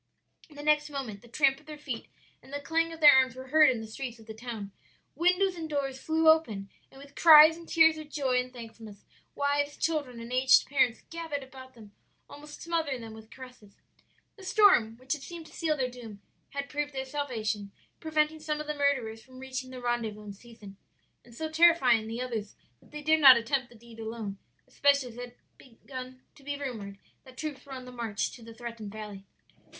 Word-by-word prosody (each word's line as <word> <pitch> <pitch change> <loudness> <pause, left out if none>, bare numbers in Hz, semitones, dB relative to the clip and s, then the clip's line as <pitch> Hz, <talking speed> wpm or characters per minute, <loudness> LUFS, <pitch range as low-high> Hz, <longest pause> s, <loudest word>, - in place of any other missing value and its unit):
"The 290 -1 -10
next 300 0 +2
moment 255 -8 -6
the 240 - -17
tramp 270 +2 +2
of 305 - -24
their 305 -1 -8
feet 265 -6 -6 0.3
and - - -17
the 285 - -3
clang 330 +3 0
of 325 0 -10
their 295 -1 +10
arms 260 -2 +3
were 260 0 -10
heard 305 0 +6
in 240 -3 -1
the - - -7
streets 240 +2 -6
of 225 - -16
the 220 - -8
town. 220 -3 -7 0.4
Windows 360 +2 +2
and 325 -2 -6
doors 275 -3 -3
flew 320 0 +1
open 225 -12 +3 0.2
and 270 - -16
with 280 0 -14
cries 315 -1 +9
and 335 0 -13
tears 320 -1 +5
of 305 -1 -10
joy 265 -4 0
and 250 0 -4
thankfulness, 225 -4 -11 0.3
wives, 285 0 0
children, 285 -7 -2
and 230 +2 -8
aged 260 +1 +5
parents 265 -4 +1
gathered 325 -4 -4
about 260 -1 -13
them 215 -3 -14 0.4
almost 295 +1 -11
smothering 320 -7 -2
them 225 -1 -9
with 220 0 -13
caresses. 250 -6 -14 0.6
"The 390 - -13
storm, 370 - +4
which 255 +2 -3
had 300 - -6
seemed 335 +2 -9
to - - -15
seal 315 -3 -1
their 260 -2 0
doom, 230 -5 -10 0.3
had 280 0 -5
proved 295 0 -3
their 265 0 -4
salvation 225 -8 -3 0.3
preventing 310 0 0
some 305 -1 -3
of 300 - -5
the 300 - -3
murderers 265 -6 0
from 255 +1 -16
reaching 260 0 -6
the 255 -1 -9
rendezvous 230 -3 -2
in 205 -1 -8
season, 210 -2 -14 0.5
and 235 -1 -17
so 315 +5 -3
terrifying 315 -9 +4
the 230 +2 -4
others 225 -5 -4 0.3
that - - -22
they 300 0 -8
dared 315 +1 +3
not 265 -4 +10
attempt 240 +2 -1
the 240 - -17
deed 230 0 -15
alone; 220 -3 -6 0.3
especially 280 -3 +2
as 230 - -13
it - - -8
had 245 0 -8 0.2
already 235 -4 -19
begun 255 -1 -9
to - - -19
be 285 +1 -4
rumored 220 -8 -6 0.3
that 260 -1 -16
troops 295 -4 -5
were 275 - -8
on 255 -1 -8
the 250 - -10
march 230 -4 -3
to 245 - -13
the 230 0 -12
threatened 230 -3 -7
valley. 205 -2 -9
260 Hz, 210 wpm, -29 LUFS, 230-300 Hz, 0.6 s, their